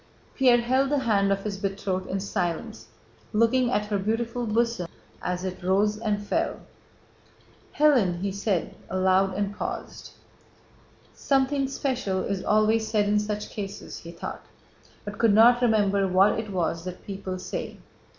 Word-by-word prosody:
Pierre 255 Hz, -3 st, +5 dB
held 260 Hz, +3 st, +2 dB
the 290 Hz, -, +2 dB
hand 205 Hz, -6 st, +2 dB
of 195 Hz, 0 st, 0 dB
his 205 Hz, -2 st, -3 dB
betrothed 195 Hz, -2 st, -2 dB
in 195 Hz, -, -1 dB
silence, 175 Hz, -, -3 dB, 0.5 s
looking 235 Hz, +3 st, +3 dB
at 210 Hz, -4 st, 0 dB
her 205 Hz, -1 st, -1 dB
beautiful 230 Hz, +4 st, -2 dB
bosom 230 Hz, -4 st, 0 dB, 0.3 s
as 180 Hz, 0 st, -3 dB
it 185 Hz, 0 st, -5 dB
rose 200 Hz, +3 st, +2 dB
and 210 Hz, -2 st, -2 dB
fell. -, -, -1 dB, 1.2 s
"Hélène!" 245 Hz, -13 st, +4 dB
he 200 Hz, 0 st, -1 dB
said 200 Hz, -2 st, -1 dB, 0.2 s
aloud 185 Hz, +1 st, +2 dB
and 205 Hz, 0 st, -2 dB
paused. -, -, -6 dB, 1.0 s
"Something 275 Hz, 0 st, +1 dB
special 255 Hz, -8 st, -2 dB
is 195 Hz, -2 st, -3 dB
always 215 Hz, +1 st, +2 dB
said 210 Hz, -2 st, +1 dB
in 210 Hz, 0 st, +3 dB
such 210 Hz, 0 st, -4 dB
cases," 200 Hz, -1 st, -7 dB
he 165 Hz, -, -11 dB
thought, 170 Hz, -, -7 dB, 0.6 s
but 205 Hz, 0 st, -7 dB
could 225 Hz, -3 st, +4 dB
not 240 Hz, +3 st, +6 dB
remember 200 Hz, -4 st, +3 dB
what 190 Hz, +4 st, +4 dB
it 220 Hz, -1 st, -5 dB
was 170 Hz, -3 st, -1 dB
that 180 Hz, 0 st, -7 dB
people 195 Hz, -2 st, -5 dB
say. -, -, -5 dB
205 Hz, 150 wpm, -26 LUFS, 190-230 Hz, 1.2 s, not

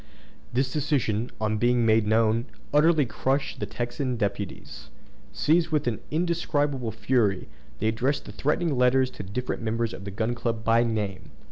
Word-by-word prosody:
This 130 Hz, +1 st, 0 dB
decision, 130 Hz, -7 st, 0 dB
on 110 Hz, 0 st, 0 dB
being 120 Hz, 0 st, +3 dB
made 110 Hz, -1 st, +4 dB
known, 110 Hz, +1 st, +3 dB, 0.3 s
utterly 150 Hz, 0 st, +5 dB
crushed 135 Hz, +4 st, -1 dB
the -, -, -3 dB
Texan 125 Hz, +1 st, -3 dB
deputies. 100 Hz, -2 st, -4 dB, 0.4 s
Seized 160 Hz, +2 st, +2 dB
with 150 Hz, -2 st, 0 dB
an 120 Hz, -3 st, -1 dB
indescribable 145 Hz, -6 st, 0 dB
fury, 110 Hz, -3 st, +1 dB, 0.3 s
they 110 Hz, -, +1 dB
addressed 125 Hz, +6 st, 0 dB
threatening 150 Hz, +1 st, 0 dB
letters 130 Hz, +1 st, +3 dB
to -, -, -8 dB
the 95 Hz, -, -9 dB
different 125 Hz, +5 st, -3 dB
members 115 Hz, 0 st, -1 dB
of 95 Hz, -, -8 dB
the 100 Hz, -, -5 dB
Gun 110 Hz, +4 st, -1 dB
Club 115 Hz, -2 st, -2 dB
by 115 Hz, +1 st, +4 dB
name. 105 Hz, -5 st, -3 dB
120 Hz, 155 wpm, -26 LUFS, 110-140 Hz, 0.4 s, utterly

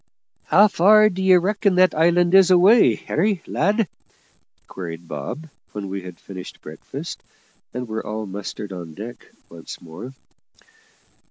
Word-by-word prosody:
"How 210 Hz, -, +5 dB
far 215 Hz, +3 st, +5 dB
d'ye 190 Hz, -1 st, +3 dB
reckon 200 Hz, +2 st, +1 dB
that 185 Hz, 0 st, +4 dB
island 175 Hz, +2 st, +2 dB
is 190 Hz, -1 st, +6 dB
away, 185 Hz, -, +5 dB
Harry, 190 Hz, -, -1 dB
lad?" 205 Hz, +5 st, 0 dB, 0.8 s
queried 85 Hz, -2 st, -8 dB
Bob, 80 Hz, -, -6 dB, 0.3 s
when 100 Hz, -2 st, -6 dB
we 95 Hz, 0 st, -5 dB
had 90 Hz, -1 st, -11 dB
finished 95 Hz, -2 st, -10 dB
breakfast -, -, -8 dB, 0.5 s
and 125 Hz, -1 st, -5 dB
were 110 Hz, 0 st, -4 dB
all 110 Hz, 0 st, -5 dB
mustered 100 Hz, 0 st, -7 dB
on 85 Hz, -4 st, -9 dB
deck 115 Hz, +4 st, -9 dB, 0.2 s
once 85 Hz, -1 st, -11 dB
more. 95 Hz, +11 st, -10 dB
150 Hz, 135 wpm, -21 LUFS, -, 0.8 s, is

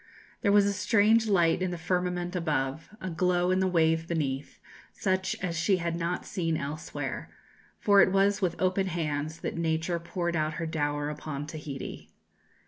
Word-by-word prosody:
There 205 Hz, -, +3 dB
was 205 Hz, 0 st, +6 dB
a 200 Hz, -, +1 dB
strange 210 Hz, +3 st, +3 dB
light 175 Hz, -4 st, +3 dB
in 185 Hz, -, +1 dB
the 175 Hz, -, -4 dB
firmament 180 Hz, +1 st, -1 dB
above, 155 Hz, -3 st, -1 dB
a 185 Hz, -3 st, -4 dB
glow 180 Hz, +1 st, +2 dB
in 185 Hz, -, +2 dB
the 190 Hz, -, +2 dB
wave 165 Hz, -2 st, +2 dB
beneath, 145 Hz, -5 st, -2 dB, 0.3 s
such 190 Hz, -1 st, 0 dB
as 170 Hz, -3 st, -1 dB
she 175 Hz, +4 st, +2 dB
had 170 Hz, -1 st, -2 dB
not 170 Hz, +1 st, -2 dB
seen 165 Hz, -4 st, -1 dB
elsewhere; 150 Hz, +3 st, -5 dB, 0.5 s
for 200 Hz, -1 st, +6 dB
it 190 Hz, -, +4 dB
was 200 Hz, +2 st, +3 dB
with 180 Hz, -3 st, 0 dB
open 185 Hz, +1 st, +1 dB
hands 160 Hz, -2 st, -2 dB
that -, -, -3 dB
Nature 165 Hz, +1 st, 0 dB
poured 170 Hz, 0 st, -2 dB
out 155 Hz, 0 st, 0 dB
her 165 Hz, +2 st, -3 dB
dower 145 Hz, -2 st, -1 dB
upon 150 Hz, -1 st, -5 dB
Tahiti. 150 Hz, -3 st, -7 dB
170 Hz, 170 wpm, -28 LUFS, 160-185 Hz, 0.5 s, was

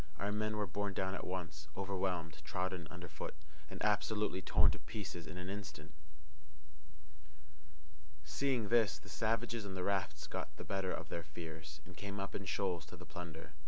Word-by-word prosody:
Our 100 Hz, +1 st, +1 dB
men 110 Hz, +1 st, +1 dB
were 105 Hz, -, +2 dB
borne 100 Hz, +1 st, 0 dB
down 95 Hz, 0 st, +2 dB
at 95 Hz, -, -2 dB
once, 80 Hz, -5 st, -3 dB
overwhelmed, 90 Hz, -5 st, 0 dB
trodden 90 Hz, +1 st, 0 dB
under 90 Hz, -1 st, -6 dB
foot, 75 Hz, -2 st, -4 dB, 0.3 s
and 95 Hz, -, -5 dB
absolutely 105 Hz, -1 st, +3 dB
torn -, -, +7 dB
to -, -, -4 dB
pieces 90 Hz, -6 st, -4 dB
in 90 Hz, -, -5 dB
an 90 Hz, 0 st, -3 dB
instant. 90 Hz, -7 st, -5 dB, 2.3 s
Seeing 115 Hz, -, +2 dB
this, 115 Hz, -4 st, +6 dB
the -, -, -12 dB
savages 115 Hz, 0 st, +2 dB
on 95 Hz, -2 st, -3 dB
the 90 Hz, -, 0 dB
rafts 85 Hz, -7 st, +1 dB
got -, -, -3 dB
the -, -, -4 dB
better 95 Hz, -1 st, +1 dB
of -, -, -3 dB
their 85 Hz, -, -1 dB
fears, 80 Hz, -1 st, -6 dB
and -, -, -10 dB
came 100 Hz, 0 st, -3 dB
up 100 Hz, 0 st, -2 dB
in 100 Hz, -, -2 dB
shoals 90 Hz, -4 st, +1 dB
to -, -, -8 dB
the -, -, -9 dB
plunder. 85 Hz, -1 st, -6 dB
95 Hz, 175 wpm, -39 LUFS, 85-100 Hz, 2.3 s, torn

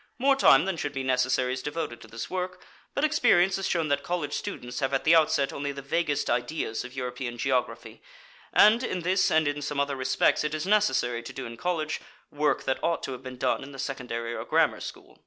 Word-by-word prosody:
More 270 Hz, +2 st, +4 dB
time 150 Hz, -, +6 dB
than 190 Hz, -3 st, -2 dB
should 145 Hz, -2 st, -3 dB
be 135 Hz, -1 st, -3 dB
necessary 130 Hz, 0 st, +1 dB
is 130 Hz, -, -4 dB
devoted 150 Hz, -5 st, -4 dB
to -, -, -12 dB
this 115 Hz, 0 st, -6 dB
work, 180 Hz, 0 st, -4 dB, 0.4 s
but 280 Hz, -, 0 dB
experience 220 Hz, -, +4 dB
has 195 Hz, -, -2 dB
shown 165 Hz, -3 st, 0 dB
that 140 Hz, 0 st, +1 dB
college 170 Hz, -3 st, -3 dB
students 125 Hz, 0 st, -5 dB
have 135 Hz, -1 st, 0 dB
at 135 Hz, -, -1 dB
the 160 Hz, -, +5 dB
outset 150 Hz, -3 st, +3 dB
only 140 Hz, 0 st, -3 dB
the 140 Hz, 0 st, -8 dB
vaguest 150 Hz, 0 st, 0 dB
ideas 120 Hz, -1 st, -1 dB
of 125 Hz, +2 st, -10 dB
European 125 Hz, -1 st, -4 dB
geography, 130 Hz, 0 st, -2 dB, 0.5 s
and 220 Hz, +4 st, +6 dB
in 185 Hz, -7 st, -2 dB
this 185 Hz, +2 st, +2 dB
and 160 Hz, -1 st, +3 dB
in 145 Hz, 0 st, -2 dB
some 145 Hz, 0 st, -3 dB
other 140 Hz, 0 st, 0 dB
respects 130 Hz, +3 st, +2 dB
it 150 Hz, 0 st, -1 dB
is 155 Hz, +2 st, -3 dB
necessary 195 Hz, -, +2 dB
to 115 Hz, -, -9 dB
do 135 Hz, -, -6 dB
in 115 Hz, -, -7 dB
college, 160 Hz, +1 st, -2 dB, 0.3 s
work 150 Hz, 0 st, 0 dB
that 130 Hz, -, -2 dB
ought 170 Hz, 0 st, 0 dB
to -, -, -4 dB
have 130 Hz, -, -7 dB
been 130 Hz, -1 st, -8 dB
done -, -, 0 dB
in 135 Hz, +1 st, -9 dB
the -, -, -9 dB
secondary 120 Hz, -3 st, -4 dB
or -, -, -4 dB
grammar -, -, +2 dB
school. -, -, -10 dB
145 Hz, 225 wpm, -27 LUFS, 130-170 Hz, 0.5 s, time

